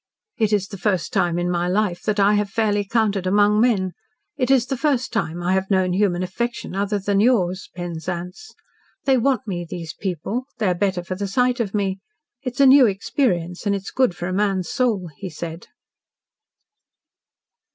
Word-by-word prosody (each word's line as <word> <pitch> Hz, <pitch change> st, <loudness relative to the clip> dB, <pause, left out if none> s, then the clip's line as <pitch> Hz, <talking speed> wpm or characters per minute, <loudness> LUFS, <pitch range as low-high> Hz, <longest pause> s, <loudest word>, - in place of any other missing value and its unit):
"It 220 Hz, -2 st, +2 dB
is 200 Hz, -2 st, +1 dB
the 200 Hz, -, -8 dB
first 190 Hz, -4 st, 0 dB
time 175 Hz, -1 st, +1 dB
in 175 Hz, 0 st, 0 dB
my 175 Hz, 0 st, 0 dB
life 185 Hz, -1 st, 0 dB
that 215 Hz, -1 st, 0 dB
I 200 Hz, +1 st, +5 dB
have 205 Hz, -1 st, +1 dB
fairly 205 Hz, -1 st, +1 dB
counted 205 Hz, -3 st, 0 dB
among 205 Hz, +2 st, +4 dB
men. 200 Hz, -7 st, +2 dB, 0.4 s
It's 260 Hz, -2 st, +3 dB
the 270 Hz, -, -2 dB
first 265 Hz, -2 st, 0 dB
time 175 Hz, -6 st, -2 dB
I 180 Hz, +2 st, +1 dB
have 190 Hz, 0 st, 0 dB
known 185 Hz, -2 st, +2 dB
human 185 Hz, -2 st, +1 dB
affection, 235 Hz, +2 st, -4 dB
other 200 Hz, +1 st, 0 dB
than 200 Hz, 0 st, 0 dB
yours, 195 Hz, -6 st, +2 dB
Penzance. 175 Hz, -, -6 dB, 0.5 s
They 270 Hz, -1 st, +4 dB
want 255 Hz, -2 st, +1 dB
me, 180 Hz, -5 st, -3 dB
these 165 Hz, -1 st, -7 dB
people; 195 Hz, -, -3 dB
they 225 Hz, -, -1 dB
are -, -, +3 dB
better 185 Hz, -1 st, -1 dB
for 180 Hz, -, -4 dB
the 200 Hz, +2 st, -3 dB
sight 250 Hz, +5 st, +1 dB
of 215 Hz, -3 st, -2 dB
me. 195 Hz, -2 st, -1 dB, 0.4 s
It 255 Hz, -3 st, -5 dB
is 280 Hz, -, +1 dB
a -, -, +7 dB
new 265 Hz, -1 st, +8 dB
experience, 190 Hz, -, -1 dB
and 200 Hz, -, +2 dB
it 195 Hz, -, -4 dB
is -, -, -7 dB
good 255 Hz, -8 st, +2 dB
for 175 Hz, -, -5 dB
a 185 Hz, -, -2 dB
man's 195 Hz, -3 st, 0 dB
soul," 210 Hz, -9 st, 0 dB
he 195 Hz, -, -6 dB
said. 165 Hz, +1 st, -7 dB
200 Hz, 190 wpm, -22 LUFS, 180-225 Hz, 0.5 s, new